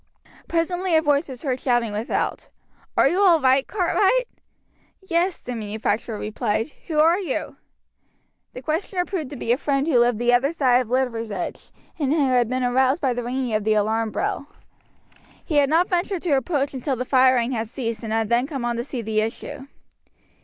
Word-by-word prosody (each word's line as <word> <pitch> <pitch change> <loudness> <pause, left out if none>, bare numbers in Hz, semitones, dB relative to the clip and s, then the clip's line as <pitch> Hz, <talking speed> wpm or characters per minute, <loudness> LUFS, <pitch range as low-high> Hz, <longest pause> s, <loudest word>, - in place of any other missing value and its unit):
Presently 350 +1 0
a 315 - +5
voice 290 0 +1
was 255 -2 -8
heard 260 -3 -1
shouting 240 -4 +1
without: 210 +3 -2 0.5
"Are - - +6
you 370 +3 +1
all 355 -5 +6
right, 265 -1 +3
Cartwright?" 415 +5 +2 0.8
"Yes," 345 +1 +1
the 250 - -6
manufacturer 215 0 -2
replied. 215 +4 -2 0.2
"Who 315 - -3
are 330 +4 +5
you?" 345 -10 -4 1.0
The 255 - -9
questioner 355 +5 -1
proved 335 -9 -4
to 290 - -7
be 235 -2 -2
a 250 - +2
friend 275 -2 0
who 265 -7 +4
lived 240 -1 +3
the 240 +1 +2
other 275 +6 +2
side 255 -6 +3
of 250 - -5
Liversedge, 230 -6 -2 0.3
and 280 -3 0
who 290 -4 +2
had 245 -3 +2
been 255 0 -1
aroused 260 +4 +2
by 265 -5 +1
the 245 0 -4
ringing 250 -1 -2
of 215 -1 0
the 215 0 +2
alarm 220 +2 +1
bell. 280 - -3 1.0
He 305 - 0
had 280 -1 +4
not 335 +4 +3
ventured 360 0 -1
to 350 - -1
approach 280 +1 -1
until 265 +1 -2
the 250 +1 -4
firing 255 -2 +3
had 230 -3 -2
ceased, 230 -1 -4
and 220 - -4
had 225 0 +1
then 240 +3 +2
come 270 -5 -4
on 240 -1 -1
to 235 - -2
see 250 -2 -5
the 215 0 0
issue. 265 +5 -5
260 Hz, 190 wpm, -23 LUFS, 235-310 Hz, 1.0 s, Are